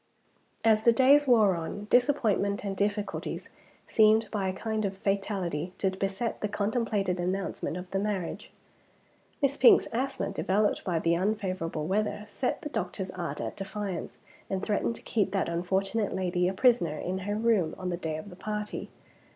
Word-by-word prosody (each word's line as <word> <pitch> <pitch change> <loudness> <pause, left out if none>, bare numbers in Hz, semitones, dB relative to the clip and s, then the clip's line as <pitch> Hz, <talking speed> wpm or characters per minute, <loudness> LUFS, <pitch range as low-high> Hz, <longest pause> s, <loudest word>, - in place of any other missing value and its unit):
As 220 -1 +4
the 235 - +7
days 275 +4 +5
wore 220 -6 +5
on, 170 +5 -5
disappointments 220 -6 +2
and 200 -1 -3
difficulties 205 +1 -2 0.4
seemed 220 0 +4
by 200 -3 -1
a - - -2
kind 220 +2 -2
of 195 -1 -2
fatality 190 -5 -2
to 190 - +1
beset 195 +4 -3
the 210 - 0
contemplated 205 -3 -1
announcement 185 -1 -2
of 180 0 -8
the 195 - 0
marriage. 200 -4 -3 0.9
Miss 275 0 +2
Pink's 255 - +7
asthma, 265 -2 -1
developed 200 +2 +1
by 175 -3 0
the 165 +1 +2
unfavorable 185 -5 -1
weather, 205 +3 -1
set 220 +4 -3
the 295 - -4
doctor's 190 -8 -3
art 170 -2 -4
at - - -4
defiance, 195 -2 -5 0.3
and 190 0 -2
threatened 215 +2 0
to - - -13
keep 215 -3 +1
that 195 - +1
unfortunate 190 +5 -1
lady 180 -1 +1
a 185 - 0
prisoner 185 - +3
in 185 +4 -3
her 205 +2 -2
room 215 -7 +2
on 185 -1 -4
the 175 - -1
day 160 -3 -3
of 170 +5 -9
the - - -10
party. 210 +2 -4
200 Hz, 165 wpm, -29 LUFS, 185-215 Hz, 0.9 s, the